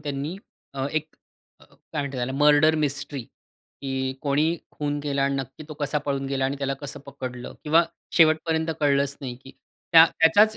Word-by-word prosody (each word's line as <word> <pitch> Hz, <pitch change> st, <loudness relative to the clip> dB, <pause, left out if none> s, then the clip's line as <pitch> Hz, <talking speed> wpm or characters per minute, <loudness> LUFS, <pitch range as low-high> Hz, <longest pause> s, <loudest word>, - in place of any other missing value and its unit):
त्यांनी 145 Hz, +4 st, -4 dB, 0.4 s
अ, 135 Hz, 0 st, -1 dB
एक 155 Hz, 0 st, -1 dB, 0.5 s
अ, -, -, -17 dB
काय -, -, -25 dB, 0.3 s
म्हणतात 140 Hz, -1 st, -4 dB
त्याला 125 Hz, +1 st, -2 dB
मर्डर 150 Hz, +2 st, +5 dB
मिस्ट्री 140 Hz, -1 st, -3 dB
की 130 Hz, +3 st, -6 dB
कोणी 150 Hz, +4 st, +2 dB
खून 145 Hz, -1 st, -2 dB
केला 140 Hz, -1 st, -1 dB
आणि 140 Hz, 0 st, +1 dB
नक्की 135 Hz, +3 st, -6 dB
तो 155 Hz, -, -7 dB
कसा 145 Hz, +1 st, 0 dB
पळून 135 Hz, -1 st, -1 dB
गेला 135 Hz, -1 st, -1 dB
आणि 135 Hz, +1 st, -1 dB
त्याला 135 Hz, -1 st, -1 dB
कसं 145 Hz, -1 st, -7 dB
पकडलं 130 Hz, -3 st, -7 dB
किंवा 160 Hz, +3 st, +5 dB, 0.3 s
शेवटपर्यंत 160 Hz, 0 st, +3 dB
कळलंच 140 Hz, -1 st, +2 dB
नाही 130 Hz, -3 st, -5 dB
की 135 Hz, -, -10 dB, 0.4 s
त्या 165 Hz, -1 st, +10 dB
त्याचाच 205 Hz, +7 st, +5 dB
140 Hz, 170 wpm, -25 LUFS, 135-155 Hz, 0.5 s, त्या